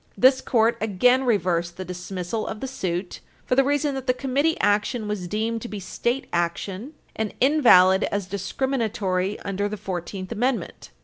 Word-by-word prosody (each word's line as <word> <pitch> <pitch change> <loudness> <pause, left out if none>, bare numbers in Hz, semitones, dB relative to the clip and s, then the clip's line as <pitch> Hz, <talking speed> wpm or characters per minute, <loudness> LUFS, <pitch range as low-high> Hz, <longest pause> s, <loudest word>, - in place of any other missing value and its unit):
This 260 +1 +5
Court 230 -1 +2
again 245 +5 +3
reversed 175 -7 0
the 185 - -5
dismissal 180 +3 -4
of 215 - -5
the - - -4
suit 185 -8 -4 0.3
for - - 0
the 270 +2 +5
reason 290 +1 +1
that 265 -1 -5
the 250 - +3
Committee 280 +5 0
action 210 +2 +1
was 205 -4 -3
deemed 220 +4 -2
to 240 - -5
be 210 -3 -6
State 240 +7 -2
action, 185 - -2 0.2
and 220 -2 -3
invalid 230 -10 +6
as 200 -2 -2
discriminatory 200 -2 -1
under 200 +1 -2
the 210 - -5
Fourteenth 185 +1 -5
Amendment. 245 +3 -2
210 Hz, 165 wpm, -24 LUFS, 185-255 Hz, 0.3 s, invalid